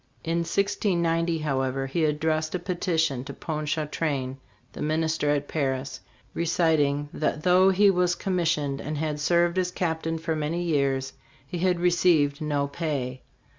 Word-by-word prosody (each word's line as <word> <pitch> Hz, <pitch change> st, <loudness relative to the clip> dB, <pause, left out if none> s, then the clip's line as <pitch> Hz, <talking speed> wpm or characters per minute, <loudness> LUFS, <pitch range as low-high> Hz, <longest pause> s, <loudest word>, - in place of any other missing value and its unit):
In 165 Hz, +1 st, 0 dB
1690, 170 Hz, -2 st, +1 dB
however, 135 Hz, -3 st, -1 dB
he 155 Hz, +4 st, 0 dB
addressed 155 Hz, +2 st, 0 dB
a -, -, +2 dB
peti 180 Hz, -1 st, -2 dB
tion 140 Hz, -6 st, +1 dB
to -, -, -7 dB
Ponchartrain, 150 Hz, -3 st, -2 dB, 0.4 s
the -, -, -8 dB
minister 155 Hz, 0 st, 0 dB
at 145 Hz, -1 st, 0 dB
Paris, 135 Hz, -3 st, -2 dB, 0.3 s
reciting 155 Hz, -4 st, +1 dB
that 155 Hz, 0 st, -1 dB
though 185 Hz, +1 st, +5 dB
he 195 Hz, +1 st, +5 dB
was 180 Hz, -1 st, +2 dB
commissioned 160 Hz, -8 st, -1 dB
and 150 Hz, +1 st, -4 dB
had 150 Hz, -1 st, -2 dB
served 170 Hz, +3 st, +2 dB
as 180 Hz, -1 st, 0 dB
captain 165 Hz, -2 st, -2 dB
for 160 Hz, 0 st, -2 dB
many 155 Hz, +3 st, -2 dB
years, 135 Hz, -5 st, 0 dB, 0.3 s
he 170 Hz, +6 st, -5 dB
had 180 Hz, 0 st, +2 dB
received 170 Hz, -5 st, +3 dB
no 145 Hz, -2 st, 0 dB
pay. 140 Hz, -5 st, -3 dB
160 Hz, 145 wpm, -26 LUFS, 145-170 Hz, 0.4 s, though